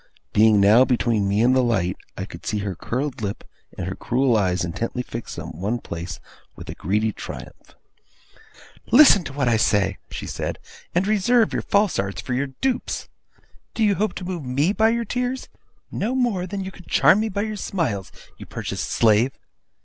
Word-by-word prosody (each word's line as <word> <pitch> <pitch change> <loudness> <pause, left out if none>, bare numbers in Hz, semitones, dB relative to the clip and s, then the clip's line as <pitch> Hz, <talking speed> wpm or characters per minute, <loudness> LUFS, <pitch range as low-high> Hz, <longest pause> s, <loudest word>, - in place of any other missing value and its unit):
Being 110 -1 +5
now 105 +5 +7
between 120 -5 +1
me 100 +2 +2
and 125 +2 +4
the 130 - +4
light, 95 -7 +1 0.2
I - - -3
could - - -11
see 105 - -2
her 100 - -2
curled 125 - -3
lip, 100 -1 -4 0.3
and 90 - -3
her 95 - -3
cruel 125 +3 +1
eyes 90 -4 +1
intently 115 +8 -3
fixed 115 -1 -7
on - - -6
one 100 +8 -2
place, 85 -7 -6 0.4
with - - -11
a - - -6
greedy 105 +5 0
triumph. - - -10 1.2
'Listen 240 -8 +8
to 140 - -6
what 140 -2 0
I 115 -2 +3
say!' 100 -3 +1
she - - -6
said; - - -4 0.4
'and 180 +2 +2
reserve 215 +3 +3
your - - 0
false 200 -1 +1
arts 100 0 -2
for 130 - -4
your 135 +3 0
dupes. 245 - -3 0.7
Do 225 - +1
you 205 -1 +4
hope 210 +2 -1
to 180 - -6
move 175 -4 -4
me 140 +9 +1
by 220 +1 +3
your 235 0 0
tears? 250 +2 -3 0.4
No 235 +5 -1
more 225 -8 0
than 195 +1 -4
you 190 - -6
could 180 - -15
charm 200 - +5
me 220 +1 0
by 200 0 -2
your 215 -1 -3
smiles, 135 - -2 0.3
you - - -10
purchased - - -4
slave. 115 +3 +3
130 Hz, 190 wpm, -23 LUFS, -, 1.2 s, Listen